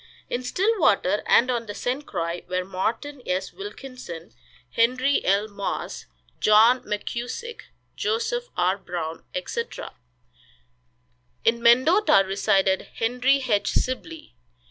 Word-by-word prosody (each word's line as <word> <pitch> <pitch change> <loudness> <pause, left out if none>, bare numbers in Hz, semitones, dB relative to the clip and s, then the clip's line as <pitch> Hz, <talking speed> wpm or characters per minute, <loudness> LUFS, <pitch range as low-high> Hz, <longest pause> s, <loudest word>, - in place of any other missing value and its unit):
In 245 - -1
Stillwater 255 - +2
and 255 +2 +5
on 235 -2 -2
the 205 - -6
St. 260 +4 -3
Croix 170 -1 -3
were 185 0 -1
Morton 225 +9 -3
S. 185 -2 -2
Wilkinson, 255 - -9 0.4
Henry 255 +4 +2
L. 200 +3 +2
Moss, 200 -2 -5 0.3
John 225 +4 +6
McKusick, 240 - -5 0.3
Joseph 465 +2 -1
R. 185 +3 +2
Brown, 165 -3 -5
etc. 465 - -4 1.5
In 235 +1 +3
Mendota 255 - +5
resided 190 0 +1
Henry 250 +4 +2
H. 205 -3 +1
Sibley. 310 +5 -3
235 Hz, 105 wpm, -24 LUFS, 195-275 Hz, 1.5 s, John